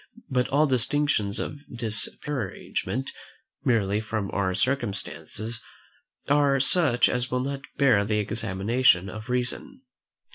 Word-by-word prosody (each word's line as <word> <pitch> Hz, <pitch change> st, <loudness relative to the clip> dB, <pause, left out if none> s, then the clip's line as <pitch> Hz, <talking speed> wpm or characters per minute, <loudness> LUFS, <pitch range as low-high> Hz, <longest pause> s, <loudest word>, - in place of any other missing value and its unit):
But 125 Hz, -1 st, +1 dB
all 145 Hz, +3 st, +3 dB
distinctions 130 Hz, -5 st, +1 dB
of 145 Hz, -, -4 dB
disparagement, 120 Hz, +2 st, -2 dB, 0.5 s
merely 105 Hz, -4 st, +2 dB
from 110 Hz, -2 st, -3 dB
our 95 Hz, -2 st, 0 dB
circumstances, 115 Hz, 0 st, -2 dB, 0.7 s
are 140 Hz, -1 st, +3 dB
such 140 Hz, -3 st, +4 dB
as 125 Hz, +1 st, -1 dB
will 125 Hz, 0 st, 0 dB
not 140 Hz, +1 st, -3 dB, 0.2 s
bear 125 Hz, -8 st, +4 dB
the 105 Hz, +1 st, 0 dB
examination 105 Hz, -1 st, +1 dB
of 110 Hz, +5 st, -8 dB
reason. 130 Hz, -, -1 dB
120 Hz, 110 wpm, -26 LUFS, 105-135 Hz, 0.7 s, such